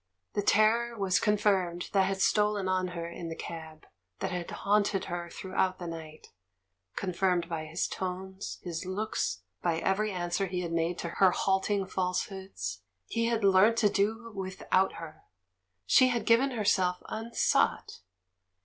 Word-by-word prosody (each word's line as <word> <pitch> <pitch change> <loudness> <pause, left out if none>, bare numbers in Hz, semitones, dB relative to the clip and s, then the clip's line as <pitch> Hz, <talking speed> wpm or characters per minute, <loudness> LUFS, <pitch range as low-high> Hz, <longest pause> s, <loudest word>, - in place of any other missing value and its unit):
The 205 - 0
terror 230 +3 +3
was 195 -2 +2
confirmed 195 -5 +1
that 190 -2 +4
had 195 0 -2
stolen 210 -2 +2
on 185 0 +1
her 170 0 -3
in 170 0 -6
the 165 - -5
cab, 160 -2 -8 0.3
that - - -3
had 180 -1 -4
haunt 205 0 +1
ed 190 - -1
her 175 -1 -4
throughout 185 +1 -1
the 175 - -7
night 160 -2 -8 0.3
— 95 -1 -50
confirmed 180 -2 0
by 165 -2 -4
his 160 +3 -1
tones, 190 +1 -5
his 170 -3 -4
looks, 185 - -2 0.2
by 170 -2 +1
every 205 +5 0
answer 175 +1 -1
he 180 0 -2
had 170 -2 -4
made 165 +1 0
to 170 - -4
her 190 +2 +4
halting 195 +2 +1
falsehoods; 185 - -3 0.2
he 230 0 -1
had 230 -2 0
learnt 200 +4 +5
to 210 -3 +4
do 220 +4 -1
with 190 -1 -6
out 190 +1 +4
her, 155 -2 -9 0.6
she 255 - +6
had 240 -4 -1
given 230 +5 +4
herself 195 -6 +1
unsought 225 +2 0
190 Hz, 160 wpm, -30 LUFS, 170-205 Hz, 0.6 s, she